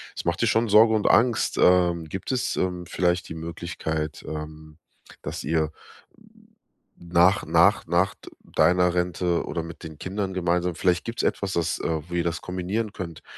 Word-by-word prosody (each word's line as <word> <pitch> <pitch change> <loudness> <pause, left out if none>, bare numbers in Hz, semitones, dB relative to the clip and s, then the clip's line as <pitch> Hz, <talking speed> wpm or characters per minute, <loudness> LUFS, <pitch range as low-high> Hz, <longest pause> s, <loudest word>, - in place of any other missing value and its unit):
es - - -6
macht 85 0 0
dir 115 - +3
schon 115 +1 +2
Sorge 110 +2 +6
und 110 -1 +1
Angst. 115 0 +3
Ähm, 90 -2 +4
gibt 95 - -5
es, 130 -2 -1
ähm, 90 -1 -2
vielleicht 90 +1 0
die - - -5
Möglichkeit, 80 -2 -4
ähm, 75 0 -8 0.4
dass - - -5
ihr 80 -1 0 1.3
nach 85 +3 +3
nach 90 +5 +3
nach 90 +3 +2
d - - -14 0.3
deiner 90 0 +4
Rente 90 -1 0
oder 85 - -3
mit 85 0 -10
den 80 -2 -9
Kindern 95 +3 -3
gemeinsam 90 -1 0
vielleicht 90 +1 +1
gibt's 115 0 -3
etwas, 100 -1 -1
das 85 -1 -1
äh, 80 -2 -2
wo 85 - -10
ihr 85 -1 +1
das 85 0 -2
kombinieren 95 +4 -3
könnt, 85 -5 -7
90 Hz, 170 wpm, -25 LUFS, 85-95 Hz, 1.3 s, Sorge